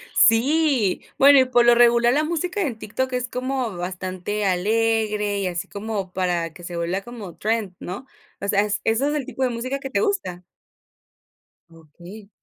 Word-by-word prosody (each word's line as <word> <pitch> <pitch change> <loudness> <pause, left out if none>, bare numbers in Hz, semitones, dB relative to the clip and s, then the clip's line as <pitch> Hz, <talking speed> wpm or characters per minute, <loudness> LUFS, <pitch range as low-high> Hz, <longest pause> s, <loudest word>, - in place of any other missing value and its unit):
Sí, 255 - +3 0.2
bueno, 280 0 +7
y 260 - +5
por 245 -1 +3
lo 240 0 +6
regular, 235 0 +5
la 300 - +2
música 345 +5 -2
en 255 - -2
TikTok 255 +5 -3
es 250 0 -1
como 255 -4 -3
bastante 185 +3 -4
alegre 210 +1 0
y 195 - -1
así 175 -1 -4
como 200 -2 -5
para 175 -3 -1
que 175 - -14
se 170 0 -6
vuelva 175 +3 -2
como 210 -5 -9
trend, 215 -4 -2
¿no?, 190 +9 -7 0.4
o - - -2
sea, 200 0 +3
¿eso 210 0 -1
es 270 +7 +1
el 290 -4 -2
tipo 265 - -3
de 255 - +2
música 255 +4 -3
que 270 -1 -7
te - - +1
gusta? 390 - -2 1.3
Okey. 170 +6 -14
220 Hz, 175 wpm, -22 LUFS, 185-255 Hz, 1.3 s, bueno